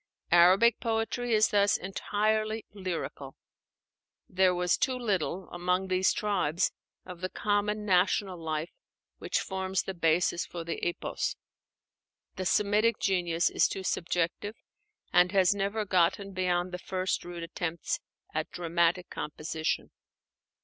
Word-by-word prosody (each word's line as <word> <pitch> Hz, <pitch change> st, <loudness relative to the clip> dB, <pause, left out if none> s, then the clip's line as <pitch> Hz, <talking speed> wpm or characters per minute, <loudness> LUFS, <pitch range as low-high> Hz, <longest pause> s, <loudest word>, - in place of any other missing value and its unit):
Arabic 185 Hz, +7 st, +6 dB
poetry 230 Hz, +2 st, -1 dB
is 215 Hz, 0 st, +4 dB
thus 200 Hz, 0 st, +3 dB
entirely 215 Hz, +3 st, -1 dB
lyrical. 175 Hz, -8 st, -5 dB, 0.9 s
There 185 Hz, 0 st, +3 dB
was 180 Hz, 0 st, +2 dB
too 260 Hz, -1 st, 0 dB
little, 195 Hz, -5 st, -1 dB
among 180 Hz, +2 st, -1 dB
these 185 Hz, 0 st, +3 dB
tribes, 180 Hz, -6 st, 0 dB, 0.3 s
of 180 Hz, -1 st, -9 dB
the 185 Hz, -, -2 dB
common 210 Hz, +1 st, 0 dB
national 185 Hz, -1 st, +2 dB
life 160 Hz, 0 st, -3 dB, 0.5 s
which -, -, -1 dB
forms 190 Hz, 0 st, -2 dB
the 190 Hz, -, -4 dB
basis 170 Hz, 0 st, +2 dB
for 170 Hz, -1 st, -7 dB
the 165 Hz, 0 st, -5 dB
Epos. 175 Hz, -, -2 dB, 1.0 s
The 185 Hz, -, -2 dB
Semitic 210 Hz, +3 st, +3 dB
genius 175 Hz, -3 st, +1 dB
is -, -, +3 dB
too 190 Hz, -, -5 dB
subjective, 180 Hz, +4 st, -1 dB, 0.6 s
and 180 Hz, 0 st, +5 dB
has 190 Hz, -1 st, +5 dB
never 205 Hz, +2 st, -1 dB
gotten 190 Hz, +1 st, +2 dB
beyond 180 Hz, -1 st, 0 dB
the 180 Hz, -, -5 dB
first 185 Hz, 0 st, -2 dB
rude 175 Hz, -1 st, -7 dB
attempts 170 Hz, -1 st, -3 dB, 0.3 s
at 155 Hz, 0 st, -2 dB
dramatic 170 Hz, +1 st, +1 dB
composition. 155 Hz, +1 st, -3 dB
185 Hz, 125 wpm, -29 LUFS, 175-205 Hz, 1.0 s, Arabic